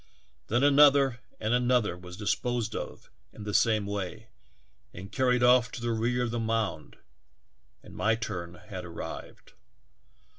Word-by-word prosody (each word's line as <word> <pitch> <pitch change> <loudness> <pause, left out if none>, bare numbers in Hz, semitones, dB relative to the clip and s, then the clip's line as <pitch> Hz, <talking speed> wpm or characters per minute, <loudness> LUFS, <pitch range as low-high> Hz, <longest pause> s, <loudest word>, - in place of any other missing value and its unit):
Then 120 +4 +1
another 140 -3 +5 0.2
and 110 +2 0
another 125 -6 +2
was 90 0 -11
disposed 110 +3 -1
of - - -7 0.2
in 105 - -10
the 105 0 -4
same 110 -2 +3
way 100 +2 -5 0.7
and 95 +2 -9
car 130 -1 +1
ried 125 0 +3
off 125 -1 +5
to - - -5
the 120 0 -2
rear 120 +2 0
of 120 - -2
the 120 - -2
mound, 110 -8 -2 0.9
and - - -14
my 110 +1 +1
turn 90 -6 -5
had 95 -1 -8
arrived 85 -1 -8
115 Hz, 150 wpm, -28 LUFS, 100-125 Hz, 0.9 s, another